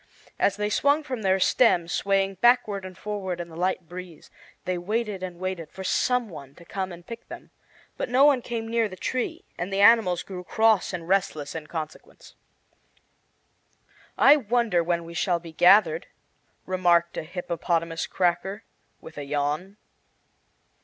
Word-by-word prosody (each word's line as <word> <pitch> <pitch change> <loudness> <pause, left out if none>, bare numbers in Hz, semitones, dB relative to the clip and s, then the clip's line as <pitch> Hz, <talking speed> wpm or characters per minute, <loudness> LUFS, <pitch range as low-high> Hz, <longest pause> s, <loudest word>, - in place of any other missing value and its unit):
As 200 - +2
they 210 0 -2
swung 285 +6 +2
from 255 -6 -5
their 190 -1 +2
stems, 180 -6 +3
swaying 195 -1 0
backward 240 -5 +3
and 185 -1 -10
forward 195 -4 -4
in 170 0 -6
the 160 - -12
light 180 0 -1
breeze, 175 -1 -10 0.3
they 185 - -1
waited 210 +1 -2
and 180 -2 -6
waited 185 -3 -4
for 190 - -8
some 250 +4 +1
one 140 -6 -11
to 170 - -16
come 190 0 -4
and 175 0 -11
pick 230 +3 -9
them. - - -11 0.5
But - - -3
no 255 +3 +4
one 280 -4 +4
came 230 -2 -4
near 230 -1 +1
the 185 - -9
tree, 325 - -3
and 180 +3 -3
the 195 +1 0
animals 205 -5 +5
grew 185 -2 -8
cross 220 +1 +2
and 170 -3 -6
restless 180 -7 0
in 160 -2 -7
consequence. 155 -2 -8 1.8
"I 290 +2 +7
wonder 230 - +1
when 170 0 -1
we 165 0 -10
shall 175 0 0
be 165 -1 -11
gathered," 175 -1 +5 0.6
remarked 175 -2 +2
a - - -2
hippopotamus 170 -1 -2
cracker, 190 +4 -1 0.4
with 160 -2 -10
a - - -4
yawn. 150 +7 -2
185 Hz, 160 wpm, -25 LUFS, 170-215 Hz, 1.8 s, I